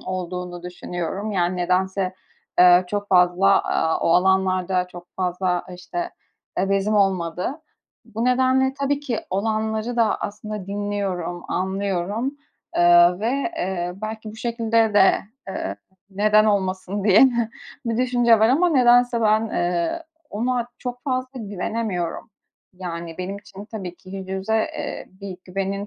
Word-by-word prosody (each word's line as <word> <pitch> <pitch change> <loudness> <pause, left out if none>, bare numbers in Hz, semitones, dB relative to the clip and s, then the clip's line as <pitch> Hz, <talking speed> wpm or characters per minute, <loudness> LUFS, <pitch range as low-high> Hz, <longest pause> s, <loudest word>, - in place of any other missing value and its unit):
olduğunu 180 -1 -5
düşünüyorum. 180 +3 -4
Yani, 180 -1 +1
nedense, 185 +1 0 0.5
ııı, 180 0 +7
çok 205 +2 -3
fazla, 180 +2 +4
aaa, 160 - 0
o - - +1
alanlarda 185 0 +2
çok 175 -1 -11
fazla, 180 -1 0
işte, 345 - -5 0.5
eee, 195 +1 +1
bezim 195 +2 +1
olmadı. 190 - 0 0.4
Bu 225 +3 -4
nedenle 260 +1 +3
tabii 280 0 -1
ki 250 -6 -2
olanları 220 +3 -1
da 230 -2 +2
aslında 210 -1 -5
dinliyorum, 195 -4 -3
anlıyorum, 195 +7 -2 0.4
ııı, 175 +1 +6
ve, 220 - -1 0.3
eee, 180 - -2
belki 220 0 -5
bu 215 - -12
şekilde 230 -2 +1
de, 195 -2 +6 0.4
ııı, 100 - -4 0.3
"Neden 210 +2 +4
olmasın?" 195 -1 0
diye 205 0 +6
de 235 -2 0 0.4
bir 230 -1 -1
düşünce 245 -2 +4
var 220 +1 +4
ama 335 +8 +4
nedense 245 -3 +4
ben, 215 0 +4
ııı, 180 - -1 0.3
ona 240 +2 -1
çok 245 -1 -6
fazla 255 -1 -2
güvenemiyorum. 200 -2 -3 0.4
Yani, 170 -2 -6
benim 190 +2 -4
için, 200 0 -11
tabii 200 -5 -7
ki, 185 - -15
yüz 190 -1 -7
yüze, 190 +3 -2
eee, 220 - -3
bir 195 -2 -6
güvenin 195 +2 -3
200 Hz, 135 wpm, -23 LUFS, 180-225 Hz, 0.5 s, ııı